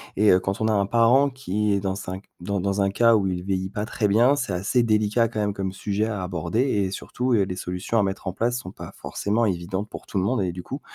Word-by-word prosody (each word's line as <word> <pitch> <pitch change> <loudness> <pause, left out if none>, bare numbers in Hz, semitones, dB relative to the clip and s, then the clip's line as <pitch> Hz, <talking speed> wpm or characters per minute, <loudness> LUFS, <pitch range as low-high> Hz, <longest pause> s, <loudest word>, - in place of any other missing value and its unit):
et 105 +1 +5
heu, 90 - +5
quand 95 +3 -3
on 110 - +2
a - - +2
un 100 -1 +2
parent 120 +6 +4
qui 105 -6 -1
est 100 - +2
dans 95 -1 -2
un 95 +1 -4 0.2
dans 95 +2 -2
dans 100 +1 0
un 100 - +2
cas 115 +2 +5
où 100 -3 +2
il 90 -1 -2
vieillit 95 -1 -2
pas 105 +1 -3
très 110 -2 0
bien, 120 +7 +4
c'est 130 -9 -2
assez 100 +7 +1
délicat 110 +1 +2
quand 110 -1 -5
même 105 -1 0
comme 95 -1 -3
sujet 105 +2 -1
à 105 -4 -3
aborder 90 +4 -1
et 100 -8 +1
surtout, 125 +4 -2
heu, 105 -3 +4
les 95 -1 -4
solutions 90 +5 -2
à - - +3
mettre 95 0 -3
en 95 - -2
place 120 +4 0
sont 125 -8 -7
pas - - -10
forcément 110 +3 -1
évidentes 95 +2 -2
pour - - -9
tout - - -4
le 95 - +2
monde 120 +3 +1
et 90 - -1
du 90 - -7
coup, 140 +2 -6
100 Hz, 275 wpm, -24 LUFS, 95-115 Hz, 0.2 s, et